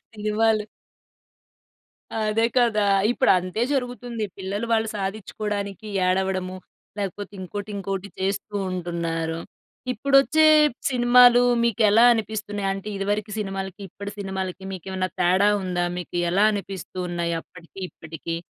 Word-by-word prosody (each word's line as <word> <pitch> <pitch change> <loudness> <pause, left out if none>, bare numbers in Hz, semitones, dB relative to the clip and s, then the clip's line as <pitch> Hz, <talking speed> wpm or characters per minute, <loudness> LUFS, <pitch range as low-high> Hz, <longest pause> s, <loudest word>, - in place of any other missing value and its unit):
అనేవాళ్ళు. 215 0 +1 1.5
అదే 220 0 +1
కదా! 235 -4 +3 0.3
ఇప్పుడు 260 - +2
అంతే 185 +5 -3
జరుగుతుంది. 245 -4 -2
పిల్లలు 200 +4 -3
వాళ్ళు 220 -1 +2
సాధిచ్చకోడానికి 205 0 -4 0.2
ఏడవడము, 185 0 0 0.4
లేకపోతే 205 +1 -4
ఇంకోటి 205 +3 -6
ఇంకోటి 195 0 -4
చేస్తూ 200 +2 -2 0.2
ఉంటున్నారు. 165 -2 -2 0.5
ఇప్పుడొచ్చే 275 +6 +4 0.4
సినిమాలు 245 -1 +6 0.2
మీకెలా 220 0 +4
అనిపిస్తున్నాయి? 210 -3 -2
అంటే, 195 +2 -6
ఇదివరకు 205 +2 -2
సినిమాలకి, 195 -1 -4
ఇప్పటి 200 +3 -8
సినిమాలకి, 190 -1 -4
మీకేవన్నా 185 0 -3
తేడా 185 +3 +4
ఉందా? 180 -1 -1
మీకి 175 0 -5
ఎలా 195 +4 +3
అనిపిస్తూ 195 -3 -6
ఉన్నాయి 170 -1 -1
అప్పటికి, 175 +2 -16
ఇప్పటికి? 160 0 -6
200 Hz, 105 wpm, -24 LUFS, 185-220 Hz, 1.5 s, సినిమాలు